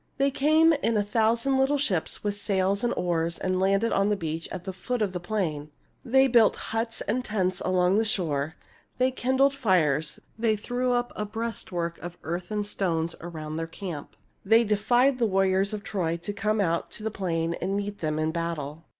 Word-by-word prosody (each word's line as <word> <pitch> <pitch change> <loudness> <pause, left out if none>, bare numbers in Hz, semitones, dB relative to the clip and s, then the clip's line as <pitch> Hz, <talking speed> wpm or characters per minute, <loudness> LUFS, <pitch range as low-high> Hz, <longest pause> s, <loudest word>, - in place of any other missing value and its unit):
They 275 +1 +2
came 315 +4 +4
in 225 -1 +1
a 205 - +2
thousand 230 +5 +1
little 270 +2 +3
ships, 200 - -1
with 205 -1 0
sails 200 0 0
and 240 - +2
oars, 170 -1 0
and 185 0 -1
landed 195 +4 +2
on 195 +1 +2
the 210 - +2
beach 165 -3 -4
at 185 -2 -5
the 190 - -5
foot 245 +7 -3
of 205 -4 0
the 180 - -2
plain. 170 -6 -2 0.3
They 265 +2 +4
built 235 -5 +5 0.2
huts 225 0 -2
and 250 +4 -1
tents 185 -5 -1
along 185 +2 +3
the - - +3
shore; 160 -7 -1 0.4
they 255 +1 +2
kindled 260 +2 +2
fires; 160 - +1 0.2
they 225 -1 +2
threw 245 +4 -1
up 245 0 0
a 210 - -2
breastwork 205 -6 -4
of 175 +1 -8
earth 175 +2 -4
and 210 -1 -1
stones 170 -5 -1
around 155 -2 -6
their 165 0 -3
camp; 165 -3 -7 0.3
they 225 +4 +5
defied 240 +5 +2
the 230 - +3
warriors 195 0 +2
of 210 -1 -5
Troy 170 -4 -1
to 205 - -3
come 215 +1 0
out 170 -4 -1
on - - -9
the 220 - -2
plain 170 -4 -1
and 195 +2 -1
meet 205 0 -4
them 155 -1 -1
in 155 0 0
battle. 165 -2 -4
200 Hz, 195 wpm, -27 LUFS, 170-230 Hz, 0.4 s, built